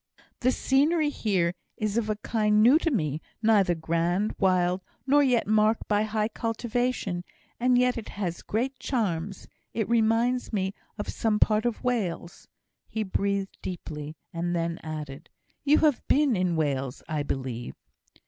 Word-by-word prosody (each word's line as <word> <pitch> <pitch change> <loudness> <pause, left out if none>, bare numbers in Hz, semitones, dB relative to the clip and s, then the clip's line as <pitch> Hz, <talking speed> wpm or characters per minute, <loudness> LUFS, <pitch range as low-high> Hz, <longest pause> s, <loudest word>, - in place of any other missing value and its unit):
"The 255 0 +3
scenery 295 +5 +2
here 185 -9 0 0.2
is 215 -1 -1
of 230 -2 0
a 215 - +1
kind 210 -1 +3
new 265 +7 +7
to 330 - +1
me; 155 - -1 0.2
neither 200 -5 +4
grand, 170 +5 0
wild, 185 -1 +2 0.2
nor 285 +2 +5
yet 250 -4 +3
marked 215 +1 +2
by 205 -1 +2
high 215 0 0
cultivation; 230 -5 -2 0.4
and 250 +1 +4
yet 250 -1 +2
it 220 - -9
has 180 -4 -4
great 255 +4 -2
charms. 200 -7 -2 0.3
It 220 -3 0
reminds 235 +2 +2
me 190 -3 -1 0.2
of 205 - -4
some 220 -2 0
parts 215 +2 +3
of 235 - -3
Wales." 200 -8 -2 0.4
He 220 - -2
breathed 200 0 -1
deeply, 155 -4 -6 0.2
and 175 +1 -1
then 165 0 -1
added, 155 -2 -7 0.3
"You 295 +1 +5
have 295 -5 +3
been 285 -4 +3
in 180 -2 +1
Wales, 135 -4 -1
I 155 -1 -1
believe?" 130 -4 -4
210 Hz, 150 wpm, -27 LUFS, 175-235 Hz, 0.4 s, new